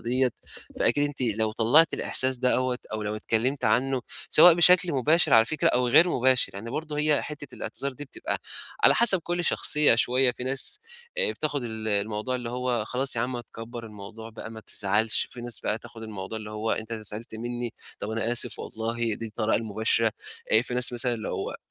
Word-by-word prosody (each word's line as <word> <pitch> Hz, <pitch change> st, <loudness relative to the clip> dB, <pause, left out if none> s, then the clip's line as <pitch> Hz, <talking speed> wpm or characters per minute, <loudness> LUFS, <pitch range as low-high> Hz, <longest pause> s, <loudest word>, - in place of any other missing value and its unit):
ديّة، 125 Hz, +1 st, +1 dB, 0.5 s
فأكيد 145 Hz, -, +2 dB
أنتِ 145 Hz, -2 st, -6 dB
لو 110 Hz, -2 st, 0 dB
طلّعتِ 130 Hz, +9 st, +4 dB
الإحساس 130 Hz, 0 st, +2 dB
دوّة 125 Hz, 0 st, 0 dB
أو 110 Hz, -, -4 dB
لو 105 Hz, +1 st, -3 dB
اتكلّمتِ 115 Hz, +6 st, 0 dB
عنّه، 130 Hz, 0 st, +1 dB, 0.3 s
سواء 170 Hz, +2 st, +8 dB
بشكل 175 Hz, 0 st, +5 dB
مباشر 155 Hz, +6 st, +3 dB
على 115 Hz, 0 st, +7 dB
فكرة 150 Hz, +5 st, 0 dB
أو 125 Hz, 0 st, +1 dB
غير 170 Hz, +8 st, +6 dB
مباشر. 130 Hz, -4 st, +2 dB
يعني 110 Hz, +4 st, -7 dB
برضه 150 Hz, +1 st, -5 dB
هي 150 Hz, -1 st, +2 dB
حتّة 145 Hz, -2 st, -8 dB
الاعتذار 140 Hz, -1 st, -5 dB
دي 145 Hz, +3 st, -9 dB
بتبقى 135 Hz, -, -5 dB, 0.4 s
على -, -, +8 dB
حسب 220 Hz, -5 st, +5 dB
كل 175 Hz, +1 st, -3 dB
شخصية 150 Hz, -5 st, +3 dB
شوية 125 Hz, +2 st, +2 dB
في 125 Hz, -, -7 dB
ناس، 135 Hz, -, +2 dB, 0.4 s
آآ -, -, +2 dB
بتاخُد 145 Hz, -3 st, -2 dB
ال 110 Hz, -2 st, -5 dB
الموضوع 105 Hz, +4 st, -1 dB
اللي 120 Hz, -2 st, -4 dB
هو 125 Hz, -2 st, -2 dB
خلاص 125 Hz, +3 st, -1 dB
يا 115 Hz, -, 0 dB
عم، 125 Hz, +2 st, -2 dB
ما 120 Hz, -, -4 dB
تكبّر 115 Hz, 0 st, -9 dB
الموضوع 110 Hz, +2 st, -11 dB
بقى 110 Hz, 0 st, -9 dB
ما 110 Hz, -1 st, -9 dB
تزعلش، 105 Hz, +2 st, 0 dB
في 125 Hz, -, -10 dB
ناس 120 Hz, -1 st, +1 dB
بقى 105 Hz, -, -2 dB
تاخُد 115 Hz, -1 st, -13 dB
الموضوع 110 Hz, 0 st, -6 dB
اللي 105 Hz, 0 st, -9 dB
هو 110 Hz, +1 st, -2 dB
إيه، 110 Hz, -, -1 dB
ده 115 Hz, +1 st, -5 dB
أنت 110 Hz, -1 st, -10 dB
زعلت 110 Hz, +2 st, -5 dB
منّي، 120 Hz, +1 st, -5 dB, 0.3 s
طَب 105 Hz, -, -5 dB
أنا 115 Hz, +1 st, -1 dB
آسف 120 Hz, -, 0 dB
والله 115 Hz, 0 st, -3 dB
دي 115 Hz, -, -7 dB
الطريقة 110 Hz, 0 st, -1 dB
المباشرة، 110 Hz, +1 st, 0 dB, 0.4 s
آآ 110 Hz, -, +6 dB
في 125 Hz, -, -6 dB
ناس 125 Hz, 0 st, +3 dB
مثلًا 120 Hz, 0 st, 0 dB
اللي 110 Hz, -, -6 dB
هو -, -, -4 dB
120 Hz, 200 wpm, -26 LUFS, 110-130 Hz, 0.5 s, سواء